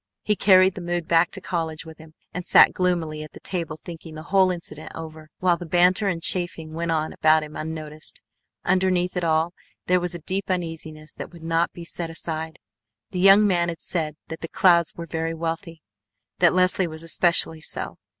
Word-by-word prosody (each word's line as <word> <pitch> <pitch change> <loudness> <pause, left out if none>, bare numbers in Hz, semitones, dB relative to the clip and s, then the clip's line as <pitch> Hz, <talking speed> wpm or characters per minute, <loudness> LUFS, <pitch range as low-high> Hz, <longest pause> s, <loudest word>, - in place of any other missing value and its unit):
He 210 - +1
carried 190 -2 +5
the 185 - -7
mood 175 -1 -2
back 170 0 +4
to 190 - -7
college 165 -4 -3
with 160 -1 -12
him, 160 0 -15 0.2
and 180 - -4
sat - - +6
gloomily 170 -4 0
at 155 - -9
the - - -11
table 170 -4 -3
thinking 165 -1 -10
the 155 - -8
whole 190 -1 +5
incident 170 -3 -6
over, 155 -1 -9
while 180 -2 +2
the 175 - -7
banter 180 +4 +3
and 170 -4 -2
chaffing 170 -3 0
went 170 +1 -3
on 155 -1 0
about 155 0 +4
him 150 0 -9
unnoticed. 155 -1 -5 0.5
Underneath 185 -1 +2
it 180 - -1
all 160 +1 +1 0.3
there 180 0 +3
was 175 0 -3
a - - -6
deep 195 +1 -2
uneasiness 160 -4 -4
that - - -8
would 170 -2 -13
not 165 +1 +1
be 170 - -10
set 170 0 -4
aside. 160 -1 -5 0.5
The 185 - -3
young 195 +3 +7
man 175 -3 +2
had 165 - -5
said 155 -4 -2
that 160 - -7
the 165 - -4
Clouds 170 -2 +3
were 170 - -6
very 165 +1 -3
wealthy. 165 0 -5 0.6
That 175 - +5
Leslie 185 0 +3
was 160 0 -7
especially 165 -1 +1
so. - - -5
170 Hz, 200 wpm, -24 LUFS, 160-180 Hz, 0.6 s, young